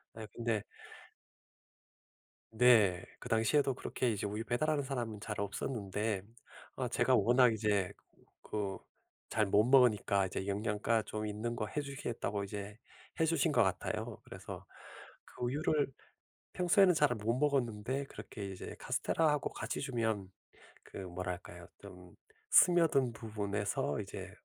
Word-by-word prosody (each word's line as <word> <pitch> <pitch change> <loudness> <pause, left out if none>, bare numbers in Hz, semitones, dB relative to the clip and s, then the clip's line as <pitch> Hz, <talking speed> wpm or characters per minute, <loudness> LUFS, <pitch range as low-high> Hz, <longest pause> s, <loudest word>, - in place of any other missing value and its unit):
네 110 -1 -7
근데 115 -3 -1 1.9
네. 110 -6 +5
그 125 - -9
당시에도 125 +4 +2
그렇게 125 -1 -1
이제 105 -1 -3
우유 105 +2 -3
배달하는 145 +5 0
사람은 120 -5 -4
잘 105 0 -5
없었는데 100 -1 -2 0.5
아 - - -2
제가 - - +3
워낙 125 0 +5
이제 105 -4 +1 0.5
그 100 -2 -3 0.5
잘 110 - +2
못 105 +1 +4
먹으니까 110 -6 +4
이제 95 +1 -4
영양가 105 +2 0
좀 110 0 -4
있는 110 +3 -3
거 110 - -2
해주시겠다고 135 -8 -3
이제 105 +2 -7 0.4
해주신 160 -3 +2
것 - - +4
같아요. - - -1
그래서 - - -9 0.6
그 - - -9
우유를 145 +3 +1 0.7
평소에는 180 +1 +5
잘 150 -2 +4
못 110 +1 -1
먹었는데 135 -2 0
그렇게 105 -5 -8
이제 95 -1 -7
카스텔라하고 150 -3 +1
같이 - - -4
주면 115 -7 -1 0.5
그 - - -11
뭐랄까요? 90 -1 -6
좀 90 -3 -13 0.4
스며든 160 -8 +5
부분에서 105 - -2
이제 - - -7
110 Hz, 275 characters per minute, -33 LUFS, 100-130 Hz, 1.9 s, 네